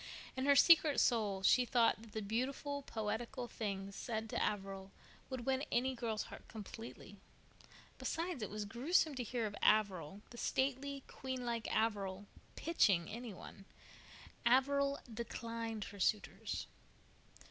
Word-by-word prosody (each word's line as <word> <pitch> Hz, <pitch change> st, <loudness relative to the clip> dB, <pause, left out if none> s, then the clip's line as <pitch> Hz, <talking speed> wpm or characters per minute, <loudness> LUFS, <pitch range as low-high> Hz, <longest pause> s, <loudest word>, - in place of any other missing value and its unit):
In 260 Hz, +1 st, -1 dB
her 280 Hz, -, +7 dB
secret 315 Hz, -1 st, +7 dB
soul 205 Hz, -5 st, +2 dB
she 250 Hz, +6 st, +6 dB
thought 235 Hz, -3 st, +3 dB
that 225 Hz, -1 st, -13 dB
the 220 Hz, -, -2 dB
beautiful, 265 Hz, +6 st, -2 dB
poetical 235 Hz, +1 st, -3 dB
things 200 Hz, -3 st, -4 dB
said 220 Hz, 0 st, -3 dB
to -, -, +1 dB
Averil 195 Hz, -2 st, -2 dB, 0.4 s
would 260 Hz, -3 st, -4 dB
win 265 Hz, 0 st, +1 dB
any 260 Hz, +2 st, +2 dB
girl's 230 Hz, -3 st, -2 dB
heart -, -, -11 dB
completely. 225 Hz, +1 st, -9 dB, 0.8 s
Besides, 335 Hz, -4 st, -2 dB
it 210 Hz, -, -2 dB
was 210 Hz, 0 st, -3 dB
gruesome 285 Hz, -, +2 dB
to 260 Hz, -, -3 dB
hear 240 Hz, 0 st, -1 dB
of 205 Hz, -1 st, -4 dB
Averil, 195 Hz, -4 st, +3 dB
the 235 Hz, -, -9 dB
stately, 275 Hz, +1 st, 0 dB
queen 260 Hz, -1 st, -5 dB
like 235 Hz, -2 st, -2 dB
Averil, 205 Hz, -3 st, 0 dB, 0.3 s
"pitching" 200 Hz, -, +3 dB
any 235 Hz, +1 st, -5 dB
one. 195 Hz, +1 st, -11 dB, 0.8 s
Averil 280 Hz, +3 st, +4 dB, 0.2 s
"declined 230 Hz, -1 st, -4 dB
her 200 Hz, -, -11 dB
suitors." 205 Hz, +2 st, 0 dB
230 Hz, 135 wpm, -37 LUFS, 210-260 Hz, 0.8 s, her